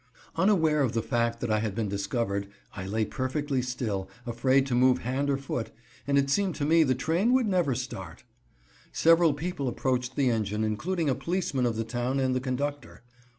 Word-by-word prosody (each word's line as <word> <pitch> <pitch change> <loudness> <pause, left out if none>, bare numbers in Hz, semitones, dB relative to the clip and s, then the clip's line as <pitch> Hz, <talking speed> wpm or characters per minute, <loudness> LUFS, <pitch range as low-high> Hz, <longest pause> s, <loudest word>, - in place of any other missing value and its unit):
Unaware 165 -5 +3
of 130 -5 +1
the 115 - 0
fact 115 -1 0
that 120 - -1
I 110 - +2
had 105 -2 -2
been 110 -2 -1
discovered, 100 0 -2 0.3
I 95 -1 -5
lay 110 +2 0
perfectly 135 +1 -2
still, 110 -6 -3 0.2
afraid 130 +3 +2
to 135 - -3
move 125 +1 +4
hand 135 +4 -1
or 140 - +2
foot, 135 -4 -4 0.4
and 140 0 +2
it 140 0 +2
seemed 190 +2 +1
to 145 - -2
me 165 +2 +5
the 130 -5 +3
train 170 - +1
would 260 -2 +3
never 175 -9 +1
start. 95 -9 -6 0.7
Several 165 0 +5
people 155 -3 -3
approached 125 0 -1
the 135 -3 +2
engine, 105 -1 -1
including 155 - -1
a 135 - +3
policeman 150 -5 -1
of 115 - -1
the 115 - -1
town 120 +3 -1
and 130 -1 +1
the 130 - +1
conductor. 140 +2 -4
130 Hz, 195 wpm, -28 LUFS, 115-145 Hz, 0.7 s, me